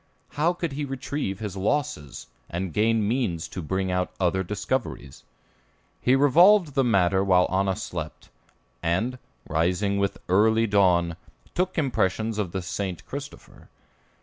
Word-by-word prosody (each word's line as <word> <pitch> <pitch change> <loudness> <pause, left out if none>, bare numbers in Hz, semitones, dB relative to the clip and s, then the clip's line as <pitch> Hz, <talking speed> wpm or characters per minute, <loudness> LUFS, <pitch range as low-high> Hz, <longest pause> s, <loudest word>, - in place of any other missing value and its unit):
How 160 +5 +1
could 170 -3 -3
he 145 +2 -3
retrieve 135 -6 -3
his 105 -2 -5
losses, 95 - -2 0.2
and 90 -1 -4
gain 110 +1 +2
means 110 -9 -1
to 90 - -6
bring 95 +4 -2
out 90 0 0
other 95 0 +1
discoveries? 70 -5 -4 0.8
He 125 - +4
revolved 165 +5 +5
the 135 - +2
matter 95 -5 +3
while 90 -2 +4
Anna 95 0 +1
slept, 85 -7 -6 0.5
and, 110 +10 -1 0.3
rising 90 +6 0
with 100 -1 0
early 110 +4 +4
dawn, 90 -5 +2 0.4
took 185 +1 -1
impressions 110 - 0
of 95 -5 -2
the 95 0 -3
"St. 95 -1 -4
Christopher." 140 +1 -9
100 Hz, 135 wpm, -25 LUFS, 90-130 Hz, 0.8 s, revolved